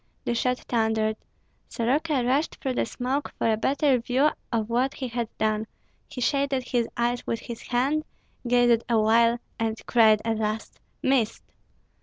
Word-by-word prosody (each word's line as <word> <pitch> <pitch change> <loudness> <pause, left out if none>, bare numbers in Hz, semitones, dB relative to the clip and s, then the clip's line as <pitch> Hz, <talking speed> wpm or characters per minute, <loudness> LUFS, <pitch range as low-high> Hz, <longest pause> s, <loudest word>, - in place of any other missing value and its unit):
The - - 0
shot 250 +1 +1
thundered. 220 -2 0 0.5
Soroka 270 +3 0
rushed 275 +6 +1
through 265 - -3
the - - 0
smoke 260 +5 -2
for 225 - +2
a - - +2
better 270 +3 +2
view 260 +6 +2 0.2
of 225 -3 0
what 250 +4 0
he 260 - -4
had 235 -1 -3
done; 215 0 0 0.4
he - - -8
shaded 275 +1 +1
his 240 -2 -1
eyes 240 +1 -1
with 230 - -2
his 235 -1 -7
hand, 270 +5 +1 0.4
gazed 240 -1 +4
awhile, 230 +1 +4 0.2
and 225 0 -1
cried 220 -3 +5
at 225 -1 0
last, 215 0 -3 0.2
"Missed!" 260 -5 +1
240 Hz, 155 wpm, -26 LUFS, 225-260 Hz, 0.5 s, cried